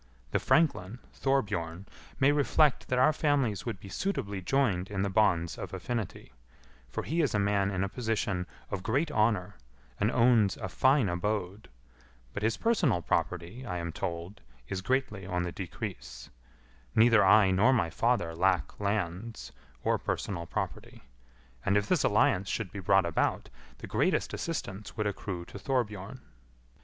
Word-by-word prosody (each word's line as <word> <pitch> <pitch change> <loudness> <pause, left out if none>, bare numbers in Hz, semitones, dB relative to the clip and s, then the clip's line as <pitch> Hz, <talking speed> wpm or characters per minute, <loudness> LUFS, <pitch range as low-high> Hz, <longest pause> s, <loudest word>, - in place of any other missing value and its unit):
The - - +2
franklin, 120 - +2 0.2
Thorbjorn, 100 -10 -1 0.3
may 140 +1 +5
reflect 145 0 +3
that 125 - 0
our 130 +5 +5
families 135 - 0
would 110 -5 -3
be 100 - -11
suitably 100 - -3
joined 100 -5 +1
in 100 -1 -1
the 100 - -1
bonds 90 -5 +2
of - - -5
affinity; 115 - -5 0.6
for - - -4
he 165 +3 0
is 145 -8 +1
a - - +4
man 100 -1 +2
in 95 -1 -1
a - - 0
position 100 -4 -2 0.2
of 100 - -2
great 140 - 0
honour, 105 - +1 0.4
and 105 - +2
owns 115 -5 +4
a 95 -4 -5
fine 130 +4 +3
abode, 100 +2 -2 0.6
but 105 - -4
his 110 +1 +1
personal 165 - +2
property, 90 - -2
I 90 -8 -4
am 85 -1 -3
told, 85 +5 -5 0.3
is 95 +5 -3
greatly 105 -4 -1
on 90 -1 -1
the 90 - -3
decrease; 60 -9 -7 0.6
neither 115 -1 +6
I 95 0 +6
nor 100 +8 +4
my 85 -11 +1
father 115 -4 +1
lack 90 -2 +1
lands 100 +1 -3 0.3
or - - +1
personal 85 -4 -3
property; - - -5 0.6
and 100 0 +3
if 105 0 0
this 180 -6 +2
alliance 100 -2 +3
should 105 -6 -2
be 100 - -6
brought 95 0 +3
about, 85 - 0 0.3
the - - -8
greatest - - 0
assistance 100 - -5
would 105 - 0
accrue 95 -3 -4
to 100 - -10
Thorbjorn." 105 -1 -2
100 Hz, 155 wpm, -30 LUFS, 90-120 Hz, 0.6 s, neither